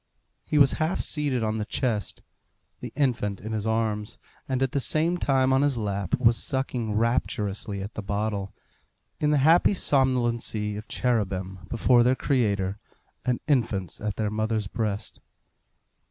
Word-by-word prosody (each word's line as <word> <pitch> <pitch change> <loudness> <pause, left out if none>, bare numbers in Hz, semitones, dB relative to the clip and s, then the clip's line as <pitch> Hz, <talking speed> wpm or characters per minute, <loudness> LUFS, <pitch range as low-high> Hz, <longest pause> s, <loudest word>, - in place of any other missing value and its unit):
He 150 - -1
was 140 -2 +7
half 160 +4 0
seated 145 -6 -1
on 110 0 -1
the 105 - -2
chest. 110 -3 -2 0.6
The - - -7
infant 115 -8 0
in 110 - -6
his 110 0 -2
arms, 110 -2 -1 0.3
and 130 0 +1
at 130 - 0
the 140 - 0
same 165 +6 +1
time 130 -3 +2
on 135 - +4
his 145 -3 +2
lap, 100 -4 -1
was 115 -2 +4
sucking 125 -5 -2
rapturously 105 -3 -1
at 100 - -7
the - - -5
bottle, 100 0 -2 0.7
in 150 - +2
the 150 - +3
happy 170 +5 +5
somnolency 120 - 0
of 105 +1 -7
cherubim 95 -7 -2
before 120 +1 +4
their 125 +2 +4
Creator, 100 -8 0 0.5
and 125 -2 0
infants 110 - 0
at 105 -1 -2
their 105 -2 -1
mothers' 110 0 -1
breast. 105 +1 -3
115 Hz, 155 wpm, -26 LUFS, 105-130 Hz, 0.7 s, was